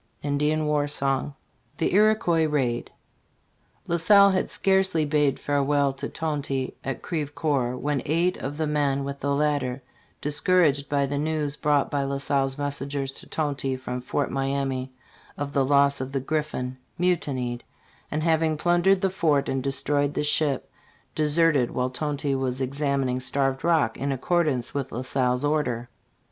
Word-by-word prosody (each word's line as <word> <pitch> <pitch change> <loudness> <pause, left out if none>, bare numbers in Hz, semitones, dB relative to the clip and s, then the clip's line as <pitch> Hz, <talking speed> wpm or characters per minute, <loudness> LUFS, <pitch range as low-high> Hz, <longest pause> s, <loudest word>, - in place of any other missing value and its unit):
* - - -36
Indian 150 +2 0
War 150 -1 +1
S 145 - -2 0.8
THE 160 - 0
IROyUOIS 180 -6 +3
RAID, 125 -5 0 1.0
LA 170 - +1
SALLE 200 +4 +6
had 185 - 0
scarcely 190 -5 +2
bade 145 -2 +2
farewell 140 -1 +1
to 135 - -6
Tonty 145 -4 -2
at 135 -2 -4
Crevecreur 145 -5 -1
when 145 0 -1
eight 170 +4 +2
of 145 +2 -5
the 160 - 0
men 145 -2 0
with 140 0 -5
the 140 0 0
latter, 140 -3 0 0.4
discouraged 150 -1 +2
by 140 -1 +2
the 140 +1 -2
news 150 -1 -1
brought 145 -1 +1
by 145 - 0
La 140 0 -2
Salle's 135 -1 +1
messengers 140 -1 -3
to - - -10
Tonty 140 -4 -2
from 125 -1 -5
Fort 130 +2 -2
Miamis, 135 -1 -1 0.5
of 145 0 -4
the 140 - +3
loss 140 0 +3
of 130 +1 -5
the 135 - 0
Griffin, 130 -3 -3 0.2
mutinied, 135 -9 -1 0.5
and 155 +1 -2
having 160 -1 +2
plundered 175 +4 +3
the 195 - +1
fort 155 -7 +1
and 135 0 -1
destroyed 145 +1 +1
the - - 0
ship, 150 -1 +1 0.4
deserted 150 -4 +3
while 125 0 -2
Tonty 145 +1 -2
was 130 -1 -1
examining 135 -1 -1
Starved 135 +1 0
Rock 160 -9 +2
in 140 +1 -2
accordance 135 -2 0
with 135 -2 -3
La 125 +3 -4
Salle's 130 0 0
order. 125 -6 -1
145 Hz, 155 wpm, -25 LUFS, 135-155 Hz, 1.0 s, SALLE